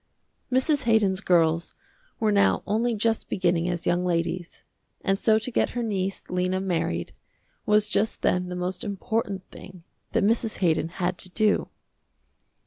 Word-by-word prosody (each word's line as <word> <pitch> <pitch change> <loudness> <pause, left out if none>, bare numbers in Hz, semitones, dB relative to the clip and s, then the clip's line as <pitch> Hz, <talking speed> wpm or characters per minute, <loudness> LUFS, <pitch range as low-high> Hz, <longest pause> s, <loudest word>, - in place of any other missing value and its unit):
Mrs. 265 +3 +2
Haydon's 210 -4 +3
girls 165 -3 +2 0.4
were 220 -2 +2
now 200 -1 +3
only 230 +3 0
just 225 +1 0
beginning 175 -2 +1
as 175 -1 -3
young 175 +1 +1
ladies, 175 0 -2 0.4
and 195 0 0
so 220 -1 +4
to 220 +3 -3
get - - +1
her 240 - 0
niece, 195 -3 -2
Lena, 180 +1 0
married, 165 - -2 0.5
was 210 0 +4
just 215 +1 -1
then 180 0 +1
the 180 - -4
most 180 +1 -3
important 200 -1 -3
thing 180 -2 -12 0.3
that - - +2
Mrs. 225 +1 +1
Haydon 165 -3 +1
had 180 0 -2
to 185 - -1
do. 215 +2 +1
190 Hz, 150 wpm, -25 LUFS, 180-215 Hz, 0.5 s, so